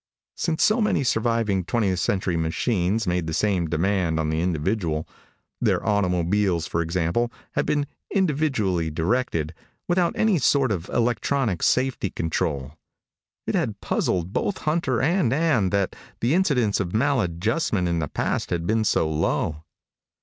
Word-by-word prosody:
Since 165 -2 0
so 215 +2 +3
many 210 -9 +2
surviving 115 -5 +1
twentieth 95 -2 0
century 95 -2 0
machines 90 +5 0
made 90 -2 -1
the 80 - -2
same 95 -5 +1
demand 85 0 +1
on 80 -1 0
the 80 +1 0
individual 85 -1 -1 0.5
their - - +1
automobiles, 90 -3 +1
for 85 - -1
example, 85 +8 0 0.2
had - - -1
been 145 -1 +1 0.2
individually 135 - +1
directed, 80 -1 -1 0.3
without 175 -1 +2
any 215 -6 +3
sort 135 -1 +3
of 90 -3 -3
electronic 120 - 0
safety 130 -6 +1
control 80 -4 -3 0.7
it - - -2
had - - -1
puzzled 90 +1 -1
both 200 - -1
Hunter 155 -6 +1
and 165 -5 +2
Ann 135 - +2
that 100 -1 0 0.2
the 120 +5 +1
incidence 135 - +2
of 95 0 -3
maladjustment 110 - +1
in 85 -1 0
the 75 - -1
past - - -2
had 85 -1 -2
been 110 +3 +1
so 80 - +2
low. 80 0 -1
100 Hz, 140 wpm, -24 LUFS, 85-125 Hz, 0.7 s, so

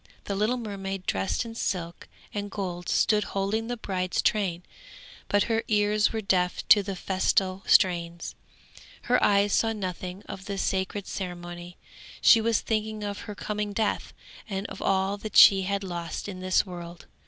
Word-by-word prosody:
The 200 - -3
little 215 +5 +1
mermaid 195 -4 -5
dressed 95 - -1
in 230 - -7
silk 175 -6 -3 0.3
and 205 -1 -3
gold 180 -3 -5
stood 210 -1 +3
holding 200 +3 -2
the 245 0 -3
bride's 185 -4 -2
train, 185 -5 0 0.6
but 205 0 +3
her 225 -1 0
ears 210 0 +2
were 225 - -2
deaf 180 -3 0
to 205 - +8
the 195 -1 -5
festal 190 0 0
strains, 170 -2 +2 0.7
her 250 +1 +2
eyes 200 0 +3
saw 225 0 +2
nothing 185 -1 -5
of 195 0 -9
the 200 -1 -4
sacred 190 +1 -1
ceremony; 175 -1 -7 0.4
she 225 - +7
was 225 0 +1
thinking 215 -1 -2
of 205 0 -4
her 210 - -5
coming 210 0 -3
death 220 0 -1 0.4
and 195 0 -3
of - - -9
all 195 +1 +1
that 210 0 -3
she 195 -1 +9
had 200 +1 -2
lost 175 -1 -5
in 190 -2 -6
this 185 +2 +2
world. 175 -2 -9
195 Hz, 165 wpm, -27 LUFS, 185-210 Hz, 0.7 s, she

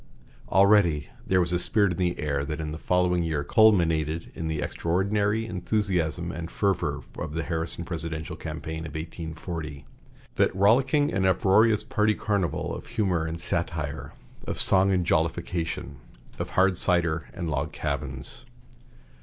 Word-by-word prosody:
Already 95 -7 +4 0.2
there 95 - +3
was 90 0 +2
a 90 - +2
spirit 100 +1 +3
in 85 - -4
the 90 -1 0
air 70 -2 -1
that 75 +2 -4
in 75 -1 -4
the 80 - -6
following 90 0 +2
year 80 -3 -1
culminated 80 -5 +3
in 80 - -4
the 80 -1 -2
extraordinary 100 +7 0
enthusiasm 90 -4 -1
and 85 +1 -6
fervor 100 -4 -1 0.2
of 75 0 -5
the 80 - -1
Harrison 80 +1 -2
presidential 80 -2 -4
campaign 80 0 -6
of - - -10
1840, 80 -2 -6 0.5
that - - +2
rollicking 130 +9 +3
and 95 0 +2
uproarious 100 +4 +4
party 110 -3 +1
carnival 100 -8 -1
of - - -9
humor 95 -8 0
and 80 +1 -5
satire, 80 -3 -3 0.3
of - - -3
song 95 0 +4
and 90 -2 +1
jollification, 85 -3 -1 0.4
of - - -3
hard 95 -1 +4
cider 85 -3 +1
and 90 -4 -4
log 70 +2 -2
cabins. 70 -3 -4
85 Hz, 145 wpm, -26 LUFS, 80-95 Hz, 0.5 s, Already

